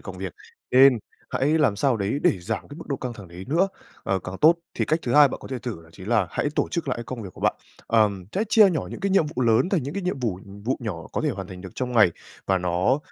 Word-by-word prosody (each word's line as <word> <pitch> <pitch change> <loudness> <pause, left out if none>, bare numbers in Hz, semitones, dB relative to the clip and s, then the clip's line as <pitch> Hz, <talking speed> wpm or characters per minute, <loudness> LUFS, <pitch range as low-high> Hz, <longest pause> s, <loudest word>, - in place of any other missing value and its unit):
công - - -8
việc, - - -5 0.4
nên 130 -1 +7 0.3
hãy 150 +4 +2
làm 130 -9 +3
sao 125 +2 +2
đấy 105 +7 -1
để - - +3
giảm 85 - -4
cái 145 - -10
mức 165 - -9
độ 140 - -1
căng 125 -1 -5
thẳng 100 -6 -11
đấy 90 +2 -9
nữa, 175 +6 +3 0.3
ờ, 95 -1 0
càng 90 +1 -7
tốt. 160 +3 +7 0.2
Thì - - 0
cách 155 +2 +1
thứ 120 - -2
hai 145 -2 +8
bạn - - -5
có - - -10
thể 130 -2 -3
thử 110 -10 -6
đó 80 - -18
chính 95 +2 -10
là 110 -6 +3
hãy 145 - -1
tổ - - +1
chức 165 -4 -3
lại 125 - 0
cái 120 - -6
công 115 0 -6
việc 95 - -8
của - - -14
bạn. - - +2 0.3
Ờm, 105 -5 +2
hãy 210 - 0
chia 210 -4 +7
nhỏ 160 - -2
những - - -7
cái 200 0 0
nhiệm 190 -5 +4
vụ 130 - 0
lớn 115 +9 +3
thành 180 -9 +1
những 140 +6 -5
cái 200 - -3
nhiệm 180 -7 -2
vụ- 105 -7 -2 0.2
vụ 130 - 0
nhỏ 90 -8 -5
có - - -1
thể - - +1
hoàn - - -5
thành 90 -1 -9
được 95 -1 -8
trong 125 -1 -3
ngày, 105 -7 +6 0.4
và 95 -1 +2
nó, 90 +10 +1
125 Hz, 295 wpm, -24 LUFS, 95-145 Hz, 0.4 s, hai